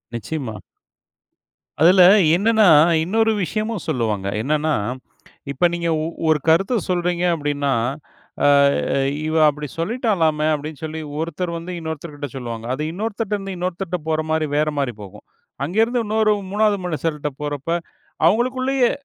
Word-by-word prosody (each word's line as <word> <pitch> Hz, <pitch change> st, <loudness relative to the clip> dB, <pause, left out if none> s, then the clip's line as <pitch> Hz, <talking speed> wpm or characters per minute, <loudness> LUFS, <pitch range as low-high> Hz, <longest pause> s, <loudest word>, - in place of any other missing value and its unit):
நிச்சியமா. 120 Hz, -2 st, -5 dB, 1.2 s
அதில 180 Hz, +3 st, +6 dB, 0.3 s
என்னனா, 220 Hz, +2 st, +3 dB, 0.4 s
இன்னொரு 225 Hz, +6 st, +2 dB
விஷயமும் 215 Hz, -1 st, -3 dB
சொல்லுவாங்க. 105 Hz, -5 st, -1 dB
என்னானா, 150 Hz, +5 st, 0 dB, 0.8 s
இப்ப 140 Hz, +5 st, +1 dB
நீங்க 170 Hz, -1 st, -1 dB
ஒ -, -, -2 dB, 0.2 s
ஒரு 155 Hz, -1 st, +3 dB
கருத்த 190 Hz, +9 st, +3 dB
சொல்றீங்க 175 Hz, 0 st, 0 dB
அப்டின்னா, 145 Hz, -3 st, -1 dB, 0.7 s
ஆ -, -, +6 dB, 0.8 s
"இவ 155 Hz, -, -2 dB
அப்டி 150 Hz, 0 st, -3 dB
சொல்லிட்டாளாமே" 170 Hz, -7 st, 0 dB
அப்டின்னு 150 Hz, 0 st, -6 dB
சொல்லி 160 Hz, 0 st, -5 dB, 0.2 s
ஒருத்தர் 170 Hz, +2 st, -3 dB
வந்து 170 Hz, +2 st, -7 dB
இன்னொருத்தர் 160 Hz, -1 st, -6 dB
கிட்ட 145 Hz, 0 st, -5 dB
சொல்லுவாங்க. 115 Hz, -3 st, -6 dB
அது 140 Hz, -, -4 dB
இன்னொருத்தர்ட்ட 215 Hz, +2 st, -3 dB
இருந்து 195 Hz, -1 st, -6 dB
இன்னொருத்தர்ட்ட 180 Hz, 0 st, -3 dB
போற 155 Hz, 0 st, +1 dB
மாரி 160 Hz, 0 st, +1 dB
வேற 155 Hz, +1 st, +2 dB
மாரி 135 Hz, -4 st, -1 dB
போகும். 100 Hz, +1 st, -12 dB, 0.4 s
அங்கே 180 Hz, +9 st, 0 dB
இருந்து 240 Hz, +2 st, +1 dB
இன்னொரு 215 Hz, 0 st, +2 dB, 0.2 s
3வது 210 Hz, 0 st, +2 dB
மனிஷர்ட்ட 155 Hz, -3 st, -2 dB
போறப்ப, 145 Hz, 0 st, -4 dB, 0.6 s
அவங்களுக்குள்ளேயே 255 Hz, +5 st, +2 dB
165 Hz, 130 wpm, -21 LUFS, 150-205 Hz, 1.2 s, அதில